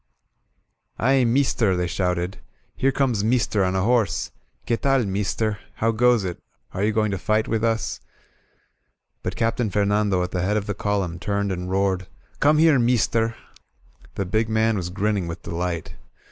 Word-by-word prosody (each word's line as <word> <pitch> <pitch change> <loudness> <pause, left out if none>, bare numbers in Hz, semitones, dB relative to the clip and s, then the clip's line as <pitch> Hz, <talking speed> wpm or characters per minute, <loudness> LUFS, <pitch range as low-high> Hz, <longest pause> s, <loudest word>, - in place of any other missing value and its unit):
"Aye, 130 +1 +3
meester!" 115 -6 +2
they 90 - 0
shouted. 90 +1 -2 0.4
Here 135 - +2
comes 125 -7 0
mees 120 +2 +2
ter 100 -3 0
on 95 0 0
a 95 - +1
horse! 110 -5 +1 0.3
Que 120 - +1
taly 135 0 +1
meester? 100 +2 -1 0.2
How 115 +1 +1
goes 120 -1 +3
it? 90 -2 -5 0.3
Are 95 - -2
you 105 - +2
going 110 -1 +1
to 100 - -2
fight 110 +2 +1
with 110 0 -1
us?'' 115 -1 0 1.2
But - - -4
Captain 115 0 0
Fernando 100 -2 +1
at 90 - -4
the 90 - -1
head 105 +4 +1
of 105 - -2
the 105 - -2
column 95 -5 -2
turned 100 +1 -1
and 90 0 -4
roared: 95 -1 0 0.3
"Come 150 +1 +4
here, 155 -3 +5
meester!'' 115 -1 +2 0.8
The 100 - -2
big 110 +4 0
man 110 0 +2
was 90 -3 -3
grinning 100 -1 -1
with 85 0 -7
delight. 85 -1 -3
105 Hz, 170 wpm, -23 LUFS, 95-115 Hz, 1.2 s, here